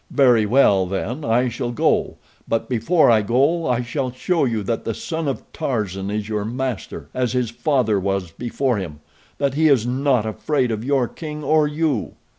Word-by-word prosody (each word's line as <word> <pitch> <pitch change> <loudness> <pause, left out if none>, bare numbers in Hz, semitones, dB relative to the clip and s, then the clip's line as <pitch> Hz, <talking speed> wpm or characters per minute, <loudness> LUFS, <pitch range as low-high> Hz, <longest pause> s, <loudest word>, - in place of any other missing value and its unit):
Very 120 -6 +4
well, 100 -6 +4
then, 110 +10 -3
I 120 +2 +2
shall 120 - -3
go; 120 - +1 0.3
but 115 - -1
before 130 +5 +3
I 110 -2 +4
go 140 +10 +1
I 125 -1 +1
shall 130 +1 -3
show 165 +6 0
you 115 -4 -1
that 115 +3 -2
the 115 - -3
son 160 -2 -4
of 135 - -2
Tarzan 105 - -2
is 105 0 -3
your 105 -1 -2
master, 125 +1 -4
as 125 -1 -1
his 125 -3 0
father 120 -6 +1
was 95 -2 -2
before 120 +4 -1
him—that 95 - -5
he 160 +3 +3
is 130 -6 +4
not 130 -2 +1
afraid 125 +3 -1
of 110 0 -3
your 135 -2 +1
king 150 +1 -7
or 155 +1 +3
you." 150 -6 -1
125 Hz, 180 wpm, -21 LUFS, 110-140 Hz, 0.3 s, Very